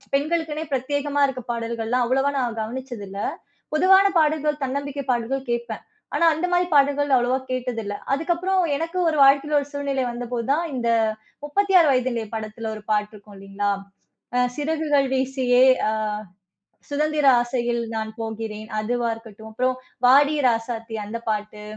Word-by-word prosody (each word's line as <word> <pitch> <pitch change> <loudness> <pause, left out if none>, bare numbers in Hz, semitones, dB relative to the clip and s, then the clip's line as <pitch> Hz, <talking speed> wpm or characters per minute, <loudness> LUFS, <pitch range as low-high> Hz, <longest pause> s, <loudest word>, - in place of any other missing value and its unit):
பெண்களுக்குனே 315 +1 -1
பிரத்யேகமா 285 +2 -1
இருக்க 255 -2 -5
பாடல்கள்ல்லாம், 235 +1 -1
அவ்வளவா 270 +2 +2
நான் 235 -3 -2
கவனிச்சது 240 -1 -6
இல்ல. 195 - -7 0.6
பொதுவான 380 +4 +6
பாடல்கள், 300 -1 +1
தன்னம்பிக்கை 280 +1 -3
பாடல்கள் 250 +2 -2
கேப்பேன். 235 -2 -3 0.3
ஆனா 335 - +4
அந்த 355 +3 -1
மாதிரி 355 0 +3
பாடல்கள் 285 0 +3
அவ்வளவா 250 +1 +2
கேட்டதில்லை. 230 -5 -3 0.2
அதுக்கப்புறம், 350 +5 0 0.2
எனக்கு 335 +3 -3
ஒரு 310 - -2
வாழ்க்கையில 280 +2 +4
ஒரு 285 - -7
சூழ்நிலை 280 -2 -1
வந்தபோது 240 -1 -4
தான், 325 +4 +1
இந்த 235 -1 -1 0.6
36 370 0 +4
வயதினிலே 245 -3 0
படத்தில 220 +1 -5
ஒரு 215 - -10
பாட்டு 210 0 0
இருக்கும் 205 0 -15
இல்லைங்களா, 195 +1 -2 0.6
அ 250 - +4 0.2
"சிறகுகள் 295 -2 +1
வீசியே 260 -1 +3 0.3
அ - - -1 1.0
சுதந்திர 300 0 +1 0.2
ஆசையில் 240 -1 -1
நான் 220 0 -3
போகிறேன்" 220 -1 -5
அதுவா 240 +2 -1
இருக்கட்டும். 220 -1 -12
அப்புறம், 255 +3 0 0.3
"வாடி 285 +4 +6
ராசாத்தி" 225 0 -2
அந்த 230 +2 -5
பாட்டு. 210 0 -4
255 Hz, 140 wpm, -23 LUFS, 225-290 Hz, 1.0 s, பொதுவான